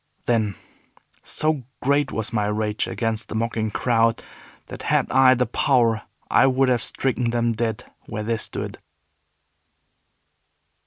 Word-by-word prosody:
Then, 110 Hz, -4 st, +1 dB, 0.7 s
so 155 Hz, -2 st, -1 dB, 0.2 s
great 140 Hz, +1 st, +1 dB
was 110 Hz, 0 st, -3 dB
my 105 Hz, -2 st, +1 dB
rage 105 Hz, 0 st, -1 dB
against 115 Hz, -1 st, -2 dB
the -, -, -5 dB
mocking 110 Hz, -1 st, -1 dB
crowd 115 Hz, +1 st, +1 dB, 0.4 s
that -, -, -9 dB
had -, -, +2 dB
I 130 Hz, 0 st, +6 dB
the 125 Hz, 0 st, +1 dB
power 115 Hz, -2 st, +2 dB, 0.3 s
I -, -, +4 dB
would 130 Hz, 0 st, +2 dB
have 125 Hz, -2 st, +2 dB
stricken 125 Hz, 0 st, 0 dB
them 120 Hz, 0 st, +1 dB
dead 110 Hz, -1 st, -2 dB, 0.2 s
where 105 Hz, -, -4 dB
they 115 Hz, +1 st, -1 dB
stood. -, -, -4 dB
115 Hz, 135 wpm, -23 LUFS, 110-130 Hz, 0.7 s, I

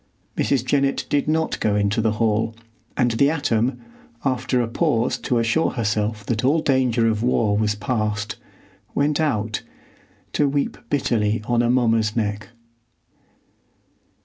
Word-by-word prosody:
Mrs. 130 Hz, -3 st, +1 dB
Jennett 140 Hz, +1 st, +1 dB
did 145 Hz, 0 st, +1 dB
not 160 Hz, +1 st, 0 dB
go 105 Hz, -1 st, +1 dB
into 105 Hz, +3 st, +1 dB
the 110 Hz, -1 st, +1 dB
hall, 110 Hz, 0 st, 0 dB, 0.4 s
and 120 Hz, -1 st, +2 dB
the 125 Hz, +5 st, +3 dB
atom, 130 Hz, -5 st, 0 dB, 0.5 s
after 130 Hz, -1 st, 0 dB
a 120 Hz, -, 0 dB
pause 115 Hz, +1 st, +1 dB
to 125 Hz, -, 0 dB
assure 115 Hz, +8 st, +2 dB
herself 105 Hz, -2 st, -1 dB
that 110 Hz, -2 st, -1 dB
all 145 Hz, +5 st, +3 dB
danger 125 Hz, -5 st, +2 dB
of 110 Hz, -1 st, 0 dB
war 115 Hz, -4 st, +2 dB
was 105 Hz, 0 st, +1 dB
past, 105 Hz, -1 st, -2 dB, 0.6 s
went 145 Hz, +1 st, +1 dB
out, 110 Hz, -9 st, 0 dB, 0.7 s
to 145 Hz, -1 st, +2 dB
weep 140 Hz, 0 st, -1 dB
bitterly 110 Hz, -6 st, 0 dB
on 120 Hz, +1 st, +2 dB
Amomma's 115 Hz, -3 st, +2 dB
neck. 105 Hz, -2 st, -2 dB
115 Hz, 135 wpm, -22 LUFS, 105-130 Hz, 0.7 s, the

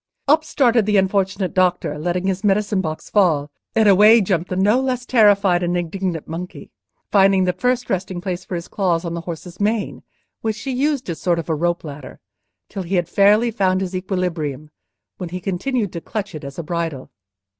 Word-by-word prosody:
Up 310 Hz, +2 st, +4 dB
started 240 Hz, -8 st, +2 dB
the 210 Hz, -1 st, +3 dB
unfortunate 190 Hz, 0 st, 0 dB
doctor, 180 Hz, -5 st, +1 dB
letting 175 Hz, +3 st, -2 dB
his 190 Hz, +1 st, -1 dB
medicine 205 Hz, -1 st, +1 dB
box 155 Hz, -3 st, -5 dB
fall, 155 Hz, -8 st, +2 dB, 0.2 s
and 220 Hz, -1 st, +4 dB
away 210 Hz, +4 st, +7 dB
jumped 180 Hz, -4 st, -1 dB
the 185 Hz, -, -2 dB
no 205 Hz, +7 st, +3 dB
less 250 Hz, -2 st, -2 dB
terrified 205 Hz, -7 st, +4 dB
and 175 Hz, 0 st, 0 dB
indignant 175 Hz, -1 st, -3 dB
monkey, 170 Hz, +3 st, -7 dB, 0.4 s
finding 195 Hz, -1 st, +4 dB
the 180 Hz, -1 st, +1 dB
first 250 Hz, +6 st, 0 dB
resting 185 Hz, -1 st, -2 dB
place 180 Hz, -1 st, -4 dB
for 185 Hz, -, -5 dB
his 170 Hz, 0 st, -5 dB
claws 180 Hz, -5 st, 0 dB
on 170 Hz, -, -3 dB
the 170 Hz, -, -4 dB
horse's 170 Hz, +1 st, -8 dB
mane, 210 Hz, +1 st, -1 dB, 0.4 s
which 220 Hz, -1 st, -2 dB
he 270 Hz, -, -3 dB
used 275 Hz, +1 st, 0 dB
as 165 Hz, -, -6 dB
a -, -, -16 dB
sort 175 Hz, -2 st, +1 dB
of 170 Hz, -, -5 dB
rope 170 Hz, +2 st, 0 dB
ladder 145 Hz, -2 st, -9 dB, 0.5 s
till 195 Hz, -, -6 dB
he 185 Hz, +2 st, -3 dB
had 175 Hz, -2 st, +1 dB
fairly 210 Hz, +6 st, +4 dB
found 190 Hz, -4 st, +1 dB
his 190 Hz, -1 st, -4 dB
equilibrium, 170 Hz, -6 st, -3 dB, 0.5 s
when 180 Hz, -3 st, -6 dB
he 180 Hz, +2 st, -5 dB
continued 200 Hz, +4 st, -2 dB
to 170 Hz, -, -5 dB
clutch 205 Hz, 0 st, -5 dB
it 155 Hz, -1 st, -8 dB
as 140 Hz, 0 st, -8 dB
a 170 Hz, -, -4 dB
bridle. 165 Hz, -4 st, -4 dB
185 Hz, 195 wpm, -20 LUFS, 170-210 Hz, 0.5 s, away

